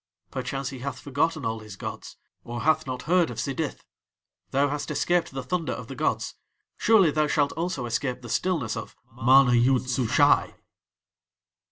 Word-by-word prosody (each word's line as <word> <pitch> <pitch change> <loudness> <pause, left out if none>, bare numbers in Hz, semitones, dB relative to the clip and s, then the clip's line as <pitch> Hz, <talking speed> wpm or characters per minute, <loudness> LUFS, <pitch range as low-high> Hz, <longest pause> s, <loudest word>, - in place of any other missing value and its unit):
Perchance 135 +1 -3
he 135 -3 -8
hath 130 0 -5
forgotten 145 +4 -1
all 110 0 -2
his 105 -2 -10
gods, - - -7 0.3
or 120 0 -5
hath 155 -2 +2
not 125 -1 -4
heard 175 +1 +3
of - - -7
Sidith. 140 +2 -3 0.7
Thou 140 +2 +2
hast 145 +2 -3
escaped 170 +4 +1
the 135 -1 -5
thunder 165 +6 -2
of - - -8
the - - -6
gods, - - -1 0.4
surely 200 -8 +4
thou 155 0 +1
shalt 145 -1 +2
also 165 -6 -3
escape 125 +2 -2
the - - -7
stillness 145 - 0
of 115 - -7 0.2
MANA 125 +1 +5
YOOD 125 +2 +3
SUSHAI." 125 -2 +3
135 Hz, 165 wpm, -26 LUFS, 125-155 Hz, 0.7 s, MANA